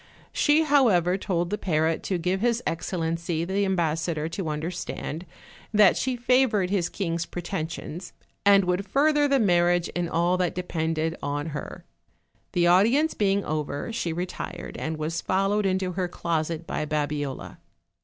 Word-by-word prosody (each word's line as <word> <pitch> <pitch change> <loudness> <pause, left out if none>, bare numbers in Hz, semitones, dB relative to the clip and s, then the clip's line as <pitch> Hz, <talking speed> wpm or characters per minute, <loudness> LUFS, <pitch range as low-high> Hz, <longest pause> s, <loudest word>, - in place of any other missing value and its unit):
She, 300 +1 +4
however, 225 - +4
told 175 -3 -1
the 210 - -1
parrot 160 -3 +1
to 190 - 0
give 180 +3 -1
hisexcellency 170 -7 -1
the 200 +2 +1
ambassador 160 -3 0
to 165 0 -4
un 150 -1 -2
derstand 170 0 -5 0.4
that 210 -3 +6
she 260 -1 -1
favored 240 -6 +2
his 185 -4 +1
king's 170 -3 -2
pretensions, 175 -1 -5 0.3
and 200 -1 +6
would 180 +2 -1
further 295 +4 +3
the 275 -1 +3
marriage 175 -4 +3
in 175 -1 -2
all 175 +2 +2
that 180 -2 0
depended 165 -2 -1
on 145 +2 -2
her. 145 -1 -7 0.7
The 175 -1 +3
audience 230 - +4
being 200 -1 +1
over, 150 +6 -3
she 175 -7 -2
retired, 175 0 -5
and 160 0 -3
was 155 +2 -2
followed 195 +2 +1
into 185 -1 0
her 180 0 -1
closet 165 -1 -2
by - - -2
Babiola. 145 -2 -3
175 Hz, 145 wpm, -26 LUFS, 165-200 Hz, 0.7 s, that